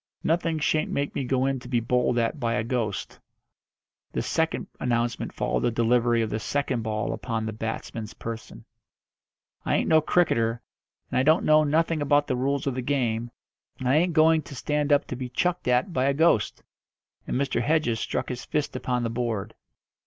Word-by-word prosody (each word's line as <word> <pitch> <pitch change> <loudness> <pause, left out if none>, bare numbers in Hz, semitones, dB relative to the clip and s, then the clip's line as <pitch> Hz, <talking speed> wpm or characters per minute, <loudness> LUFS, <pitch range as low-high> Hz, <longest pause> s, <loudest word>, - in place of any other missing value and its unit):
"Nothing 165 0 +1
shan't 155 0 +1
make 140 0 -2
me - - -2
go 130 +1 +1
in 135 -1 0
to 125 - -11
be 125 -1 +1
bowled 125 +1 +1
at 120 +6 0
by 115 -2 0
a 110 - 0
ghost." 115 -4 -3 0.9
This - - -2
second 160 0 0
announcement 120 -1 -1
followed - - -1
the - - +1
delivery 120 0 +2
of 110 - -3
the 110 - -1
second 135 +1 -1
ball 110 0 -2
upon 115 -3 -3
the 110 - -3
batsman's 110 0 -5
person. 115 -1 -7 1.0
"I - - +1
ain't - - +1
no 160 -1 +5
cricketer, 115 -9 +2 0.5
and - - +2
I - - +4
don't 155 +6 +3
know 155 0 +6
nothing 160 +1 +1
about 145 0 +3
the 130 - -1
rules 135 +2 -1
of 135 - 0
the 130 - -3
game, 120 -3 -1 0.5
and 130 - -4
I 135 +4 +4
ain't 175 +2 +2
going 160 0 +5
to 140 - -10
stand 150 +3 -1
up 145 0 +4
to - - -5
be 125 0 -5
chucked 175 +7 -1
at 125 +9 +2
by 130 -3 +1
a 140 0 +2
ghost," 155 -9 +2 0.6
and - - -1
Mr. 140 -1 0
Hedges 150 -8 +1
struck - - -2
his 125 -1 -5
fist 150 -1 -2
upon 125 -1 -1
the 115 - -1
board. 115 -3 -2
125 Hz, 195 wpm, -26 LUFS, 115-150 Hz, 1.0 s, know